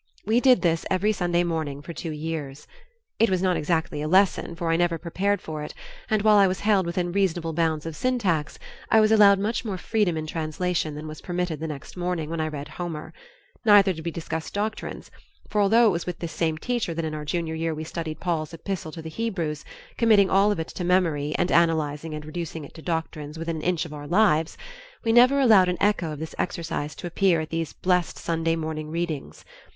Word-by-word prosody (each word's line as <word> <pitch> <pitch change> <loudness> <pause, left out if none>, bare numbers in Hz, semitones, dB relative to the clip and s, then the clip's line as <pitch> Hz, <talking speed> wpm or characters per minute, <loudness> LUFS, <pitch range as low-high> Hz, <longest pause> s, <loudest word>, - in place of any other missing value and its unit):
We 220 +4 +3
did 255 -3 +4
this 165 -2 +2
every 190 +3 +2
Sunday 175 -3 +1
morning 160 -5 -2
for 170 - -7
two 165 - -5
years. 150 -2 -5 0.5
It 225 - +4
was 185 -1 0
not 185 -1 +2
exactly 160 -1 -1
a 150 - -2
lesson, 185 -1 +3
for 170 -1 -1
I - - +3
never 170 0 +1
prepared 190 +4 -1
for 155 -1 -5
it, 150 - -7 0.3
and 215 -2 +1
while 215 -1 +6
I 200 -1 +6
was 185 +1 -2
held 200 -4 +3
within 175 0 -1
reasonable 175 -4 0
bounds 160 -1 0
of 165 -1 -5
syntax, 200 - 0 0.3
I 220 - +6
was 215 0 +4
allowed 205 -2 +7
much 215 +6 -1
more 205 -5 -3
freedom 195 -3 0
in 155 - -3
translation 160 0 -2
than 155 +1 -7
was 155 0 -8
permitted 175 -3 -2
the 160 - -3
next 145 -3 -8
morning 175 -3 -2
when 165 -1 -2
I 155 - 0
read 145 -2 -6
Homer; 165 -1 -6 0.5
neither 205 -4 +6
did 160 -1 -8
we 170 - -2
discuss 160 -1 -5
doctrines, 215 +2 -4 0.4
for 210 - +2
although 225 +4 +5
it 215 - +5
was 170 0 -3
with 180 - -3
this 170 -1 -5
same 160 -2 -1
teacher 225 -2 -2
that 165 0 -2
in 155 - -3
our 150 -1 -4
junior 160 +2 -2
year 160 0 -2
we 155 - -5
studied 160 -1 -5
Paul's 165 -2 -2
Epistle 180 -1 -5
to 165 - -8
the - - -6
Hebrews, 165 -6 -3 0.3
committing 215 -4 +4
all 195 +2 +4
of 205 - -2
it 160 - -4
to 180 - -5
memory 165 -5 +1
and 175 +1 0
analyzing 160 -2 +1
and 150 0 -7
reducing 160 -1 -5
it - - -14
to 160 - -11
doctrines 160 -2 -4
within 165 0 -3
an - - -5
inch 175 0 0
of 155 - -9
our 145 -1 -8
lives, 170 -4 +2 0.5
we 225 - +3
never 250 +4 +6
allowed 215 -9 +6
an 180 - -1
echo 200 -6 +1
of 150 - -5
this 160 +2 -6
exercise 165 -4 -3
to - - -8
appear 175 0 +2
at 155 0 -5
these 165 -2 -2
blessed 180 -2 0
Sunday 165 0 0
morning 155 -1 -4
readings. 160 - -4
170 Hz, 220 wpm, -25 LUFS, 155-190 Hz, 0.5 s, allowed